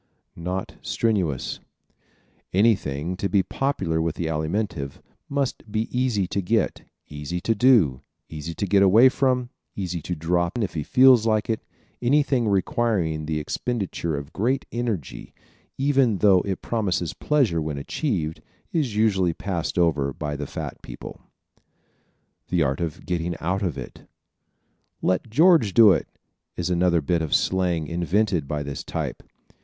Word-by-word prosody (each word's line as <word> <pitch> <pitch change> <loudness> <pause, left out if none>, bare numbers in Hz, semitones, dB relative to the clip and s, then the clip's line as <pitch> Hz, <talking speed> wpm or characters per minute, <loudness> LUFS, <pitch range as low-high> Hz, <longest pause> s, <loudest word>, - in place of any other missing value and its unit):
Not 90 +3 -4
Strenuous 95 - -1
¶ - - -32 0.9
Anything, 90 -6 +1
to 100 - -1
be 95 +1 +3
popular 95 -14 -1
with 80 0 -1
the 85 - -3
Alimentive, 80 -2 -2 0.4
must 140 -6 -2
be 110 +3 -2
easy 125 -6 +1
to 100 +2 -2
get, 110 +5 0 0.3
easy 75 +4 -5
to 115 - +1
do, 100 - +4 0.3
easy 80 +1 -6
to 100 - -1
get 100 +1 +3
away 110 +7 +7
from, 125 -2 0 0.2
easy 90 -4 -3
to 90 +4 -4
drop 85 +4 0
if 105 -5 -2
he 80 - -2
feels 125 - +5
like 110 0 +1
it. 110 - -1 0.4
Anything 130 -2 +2
requiring 95 -6 0
the 80 -1 -1
expenditure 85 -2 -3
of 70 +2 -8
great 130 +6 0
energy, 115 - -4 0.4
even 135 -6 +2
though 95 -2 +5
it 95 -2 -3
promises 95 -7 -1
pleasure 130 - +1
when 75 -2 -3
achieved, 80 - -2 0.3
is 140 -10 -1
usually 95 -5 +2
passed 90 -4 -3
over 75 -5 +2
by 75 0 -4
the 75 0 -5
fat - - -6
people. - - -9 1.3
The 85 -2 +2
Art 70 +2 -1
of 80 -3 -4
Getting 85 -1 -2
Out 95 +4 -1
Of 90 -8 -2
It - - -7
¶ - - -27 1.0
"Let 95 +5 0
George 150 - +4
do 110 -3 +8
it" 90 - +1 0.5
is 90 +1 -1
another 85 -1 +3
bit 85 +3 0
of 80 - +1
slang 90 -4 +1
invented 85 0 0
by 75 0 -2
this 70 -1 -5
type. - - -4
95 Hz, 150 wpm, -24 LUFS, 80-115 Hz, 1.3 s, do